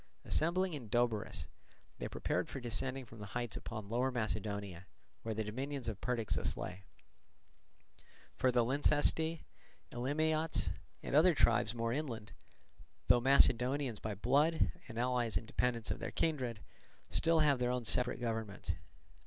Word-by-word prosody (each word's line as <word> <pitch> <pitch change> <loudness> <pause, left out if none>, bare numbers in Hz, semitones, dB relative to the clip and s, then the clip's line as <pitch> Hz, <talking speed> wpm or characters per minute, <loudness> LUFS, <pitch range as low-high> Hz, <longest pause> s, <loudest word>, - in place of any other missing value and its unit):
Assembling 175 +3 +1
in 125 -7 -6
Doberus, 120 -2 0 0.5
they - - -3
prepared - - -2
for - - -5
descending 125 +3 -2
from 115 -1 -13
the 105 - -7
heights 120 -2 -3
upon 110 -3 -6
Lower 120 +4 +1
Macedonia, 100 -6 -3 0.3
where 110 -1 -3
the 110 - -1
dominions 130 +4 -4
of 110 -3 -4
Perdiccas 120 -3 -1
lay; 95 +2 -6 1.5
for 130 - +2
the 120 -1 +3
Lyncestae, 150 +4 +2 0.5
Elimiots, 155 +6 0 0.3
and - - -2
other 165 +3 +6
tribes 115 -3 +3
more 115 0 -1
inland, 120 -7 -4 0.8
though 120 - +6
Macedonians 130 -1 +4
by 105 -1 -4
blood, 145 - +3 0.2
and 115 - -8
allies 120 -4 +1
and 110 - -6
dependants 120 0 0
of - - -3
their - - -3
kindred, 130 -9 -1 0.5
still 165 -1 +3
have 145 -4 +4
their 125 0 +1
own 125 -1 -1
separate 120 +5 +2
governments. 110 -4 -3
120 Hz, 140 wpm, -35 LUFS, 110-140 Hz, 1.5 s, other